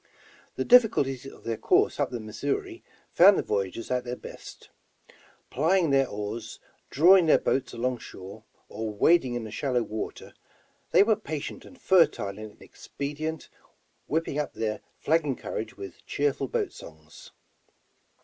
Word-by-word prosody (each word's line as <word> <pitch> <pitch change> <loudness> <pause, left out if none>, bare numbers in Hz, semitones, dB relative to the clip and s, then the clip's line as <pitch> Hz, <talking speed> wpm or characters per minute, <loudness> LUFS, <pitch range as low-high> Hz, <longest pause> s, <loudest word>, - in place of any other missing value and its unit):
The - - -2
difficulties 145 - +4
of - - -13
their 115 -1 -3
course - - +2
up - - +1
the 120 - -5
Missouri 140 - -4 0.3
found 190 +3 +7
the - - 0
voyageurs 100 +5 -3
at 125 -1 0
their 125 0 -4
best. - - -12 0.8
Plying 165 +3 +2
their 135 -1 +3
oars, 105 +2 -6 0.3
drawing 175 +4 +6
their - - +6
boats 130 -1 -1
along 125 +1 -2
shore, 100 +2 -11 0.2
or 110 +1 -5
wading 130 +4 +3
in 120 - -3
the 110 - -8
shallow 125 +1 -1
water, 110 0 -6 0.6
they - - +6
were 220 +1 +3
patient 160 -9 -6
and 265 - -15
fertile 135 - +2
in 110 -1 -10
expedient, 155 +3 -6 0.6
whipping 155 -1 -1
up 150 - -3
their 110 -1 -3 0.2
flagging 150 -4 +1
courage 110 - -6
with 100 - -10
cheerful 140 -1 -1
boat - - -2
songs. 80 0 -13
130 Hz, 145 wpm, -27 LUFS, 110-160 Hz, 0.8 s, found